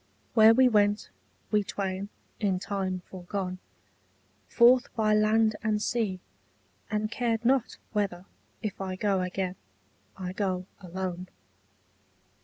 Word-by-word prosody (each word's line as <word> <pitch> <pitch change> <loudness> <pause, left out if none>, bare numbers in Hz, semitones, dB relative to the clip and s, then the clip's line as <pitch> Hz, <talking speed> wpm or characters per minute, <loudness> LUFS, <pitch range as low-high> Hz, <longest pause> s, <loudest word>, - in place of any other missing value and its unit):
Where 220 0 +7
we 260 +1 +6
went, 210 -2 +2 0.4
we 210 -1 +3
twain, 195 0 -3 0.3
in 195 -4 +1
time 190 -2 -3
foregone, 185 0 -5 0.9
Forth 245 +1 +5
by 215 -2 +2
land 215 +1 +3
and 215 -1 +1
sea, 210 -4 -1 0.7
and 215 0 -1
cared 230 -1 -1
not 260 -1 +2 0.2
whether, 195 -4 -1 0.4
If 205 -2 -4
I 190 -1 -3
go 195 -1 +1
again, 185 0 -3 0.6
I 185 -1 -5
go 185 -2 -1
alone. 185 0 -5
205 Hz, 115 wpm, -28 LUFS, 185-220 Hz, 0.9 s, Where